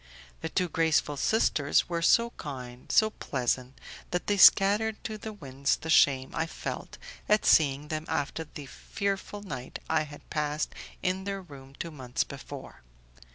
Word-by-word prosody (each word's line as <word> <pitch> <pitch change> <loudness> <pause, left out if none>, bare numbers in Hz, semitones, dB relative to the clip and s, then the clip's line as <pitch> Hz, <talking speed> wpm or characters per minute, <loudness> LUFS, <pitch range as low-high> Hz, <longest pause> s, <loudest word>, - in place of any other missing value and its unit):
The - - -3
two 180 -1 0
graceful 160 -3 +1
sisters 145 -4 +2
were 170 -1 -2
so 235 +8 +4
kind, 125 - -8
so 220 0 +4
pleasant, 130 - -2 0.3
that 180 - -2
they 205 - +1
scattered 205 +3 +6
to 220 - -4
the 220 - -6
winds 140 -8 -1
the 160 - -4
shame 130 -3 +4
I 160 - -1
felt - - -6 0.3
at 210 0 +4
seeing 145 -1 +4
them 155 0 -3
after 160 0 -2
the 150 -1 -9
fearful 200 +6 -4
night 125 -10 -6
I - - +2
had 145 -1 -9
passed 150 -1 -1 0.3
in 190 +1 -1
their 195 -1 -3
room 135 -4 -13
two 170 - -5
months 130 -5 -2
before. - - -10
155 Hz, 155 wpm, -29 LUFS, 140-195 Hz, 0.3 s, scattered